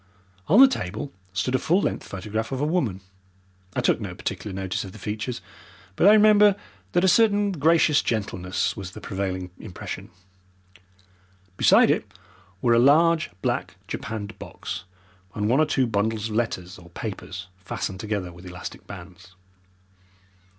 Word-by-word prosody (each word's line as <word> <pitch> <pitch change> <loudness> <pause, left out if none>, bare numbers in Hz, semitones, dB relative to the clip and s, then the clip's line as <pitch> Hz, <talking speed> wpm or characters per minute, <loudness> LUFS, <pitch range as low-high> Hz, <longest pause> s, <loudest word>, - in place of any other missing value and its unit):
On 195 +10 +6
the 270 - +11
table 110 - -4 0.2
stood 100 +7 -1
a 130 - +3
full 175 +8 +2
length - - -2
photograph 105 +5 -4
of 130 - -2
a 145 - +1
woman 140 - 0 0.7
I - - +1
took - - +2
no - - -5
particular 105 - -4
notice 95 -1 -3
of 95 - -9
the - - -10
features, 110 +4 -4 0.5
but 180 - +4
I - - +10
remember, 210 -1 +6 0.4
that 175 - +3
a - - +5
certain 205 -1 +4
gracious 160 -2 +4
gentleness 95 -5 -1
was 95 -3 -7
the - - -8
prevailing 95 -2 -4
impression. 95 -6 -7 1.5
Beside - - +6
it - - -1 0.5
were 120 - +4
a 115 - +5
large 160 +5 +5
black 120 -8 -1
japanned 110 -5 -5
box 95 - -7 0.5
and 105 0 0
one 125 +6 +3
or 155 - +4
two 130 - +2
bundles 110 0 -1
of 105 - -4
letters 95 -7 -2
or 85 -1 -15
papers 95 0 -6
fastened 95 +1 -4
together 100 -4 -3
with 90 +2 -12
elastic 90 0 -8
bands. 90 -1 -11
110 Hz, 155 wpm, -25 LUFS, 95-145 Hz, 1.5 s, the